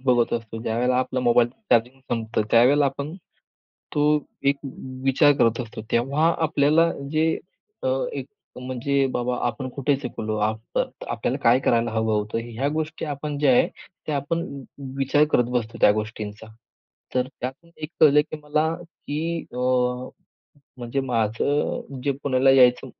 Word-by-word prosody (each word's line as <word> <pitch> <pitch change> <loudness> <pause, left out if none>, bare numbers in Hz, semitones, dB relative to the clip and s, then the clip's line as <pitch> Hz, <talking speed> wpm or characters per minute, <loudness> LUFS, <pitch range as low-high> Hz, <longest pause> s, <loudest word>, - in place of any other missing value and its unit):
बघत 120 -3 +3
असतो. 115 -1 -5
ज्यावेळेला 125 +3 +1
आपला 130 0 -1
मोबाईलचं 120 - +2
चार्जिंग 125 +3 0
संपतं. 115 -1 -1
त्यावेळेला 135 +5 +5
आपण 140 +4 -4 0.8
तो 145 - +2 0.4
एक 140 0 +3 0.5
विचार 140 +2 +5
करत 115 +2 +3
असतो. 110 -2 -7
तेव्हा 140 +8 +2
आपल्याला 155 +2 +3 0.2
जे 155 +1 +2 0.6
अ, - - +2 0.2
एक - - -5 0.3
म्हणजे 135 +2 0
बाबा 125 0 -1
आपण 120 +2 -3
कुठे 140 +2 0
चुकलो? 110 -5 -4
आप 110 +1 -2
आपल्याला - - -2
काय 120 +2 +5
करायला 115 0 +2
हवं 110 -1 +1
होतं? 105 +1 -1
ह्या 120 +4 -2
गोष्टी 155 0 -3
आपण 145 0 -4
ज्या 145 -2 +4
आहेत, 125 - +4 0.4
त्या 150 - -1
आपण 165 +5 -1 0.6
विचार 135 +2 +3
करत 120 - +4
बसतो 115 -1 -3
त्या - - +8
गोष्टींचा. 105 0 -5 0.7
तर 125 0 +2
त्यातून 135 +7 -6
१ 155 -1 -6
कळलं, 150 -1 +7
की - - -4
मला 155 +1 +1
की 165 -1 -5
अ, - - -8 1.2
म्हणजे 120 +3 -2
माझं 130 +3 -1
जे 140 - +2
पुण्याला 135 -1 +3
यायचं, 125 -1 +5
130 Hz, 145 wpm, -24 LUFS, 115-145 Hz, 1.2 s, त्या